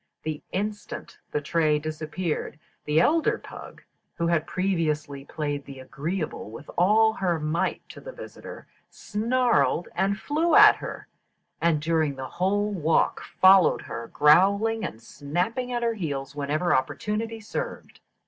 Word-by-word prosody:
The 155 -1 -4
instant 205 +2 -5
the 150 - -2
tray 155 0 +2
disappeared, 155 +1 -4 0.3
the 150 +1 +2
elder 320 - +3
pug, - - -11 0.3
who 170 - -1
had 170 -2 +1
previously 155 -7 -1
played 145 -1 -3
the 135 -1 -10
agreeable 150 - -4
with 115 +7 -10
all 220 +5 +4
her 180 -5 -1
might 155 +2 -2
to - - -11
the - - -8
visitor, - - -10 0.2
snarled 230 -4 0
and 195 +3 0
flew 320 +4 +1
at - - +8
her, - - -7 0.5
and 165 -2 +2
during 155 -2 0
the 130 0 -6 0.2
whole 205 +3 +1
walk 165 -3 +1
followed 190 -1 +5
her, 115 0 -6
growling 200 +9 +4
and 115 - -6
snapping 180 - -3
at 240 -1 -1
her 230 -1 +1
heels 145 -9 -4
whenever 150 +5 0
opportunity 215 +11 -2
served. 220 0 -6
170 Hz, 140 wpm, -26 LUFS, 150-210 Hz, 0.5 s, at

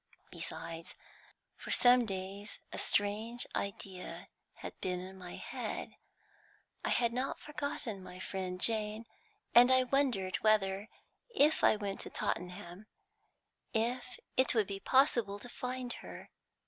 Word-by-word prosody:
Besides, 165 0 -6 0.6
for - - -10
some 245 -1 +6
days 195 +1 -5 0.2
a - - -4
strange 215 +4 0
idea 190 -2 -5 0.3
had - - -7
been 180 -1 -1
in 185 +1 -8
my 180 -2 -8
head. - - -4 0.9
I - - 0
had 235 -1 +2
not 255 +3 -1
forgotten 285 -8 -4
my 185 0 -9
friend 185 -1 -3
Jane, 215 +1 +2 0.5
and 245 +2 +9
I 260 0 +6
wondered 245 -8 +1
whether, 205 -1 +2 0.4
if 315 -9 +4
I - - +7
went 200 -2 -3
to - - -5
Tottenham, 180 +2 -3 0.9
it 250 +2 0
would 220 -2 +4
be 195 0 -4
possible 235 -5 +3
to 225 - -8
find 250 0 -4
her. - - -9
215 Hz, 125 wpm, -34 LUFS, 190-245 Hz, 0.9 s, and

